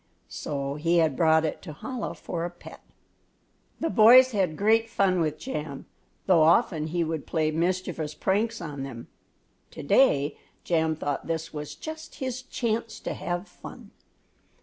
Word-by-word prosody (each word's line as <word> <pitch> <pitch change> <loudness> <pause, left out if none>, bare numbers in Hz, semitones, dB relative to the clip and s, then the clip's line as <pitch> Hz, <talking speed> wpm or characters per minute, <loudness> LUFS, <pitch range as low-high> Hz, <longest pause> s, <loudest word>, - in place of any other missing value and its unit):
So 140 -1 -4
he 170 +3 +2
had 160 -5 +3
brought 160 0 +4
it 155 - -3
to 155 -5 -9
Chola 255 -4 -4
for 170 -1 -5
a 175 - -2
pet. 175 - -13 1.0
The 330 - -1
boys 250 +4 +8
had 185 -8 0
great 225 +2 +3
fun 190 -4 +2
with 155 -1 -1
Jam, 150 - -6 0.4
though 180 -4 +5
often 160 -1 +3
he 170 +2 0
would 160 -2 -4
play 155 -2 0
mischievous 170 -2 -2
pranks 220 +6 0
on 145 -5 -6
them. 130 -4 -8 0.6
To - - -9
day 150 - +3 0.2
Jam 160 -2 +1
thought 145 -2 -3
this 160 -1 -3
was 150 -1 -6
just 315 0 -8
his 255 -1 -4
chance 230 -3 -3
to - - -3
have 175 +2 -4
fun. - - -12
170 Hz, 155 wpm, -26 LUFS, 155-215 Hz, 1.0 s, boys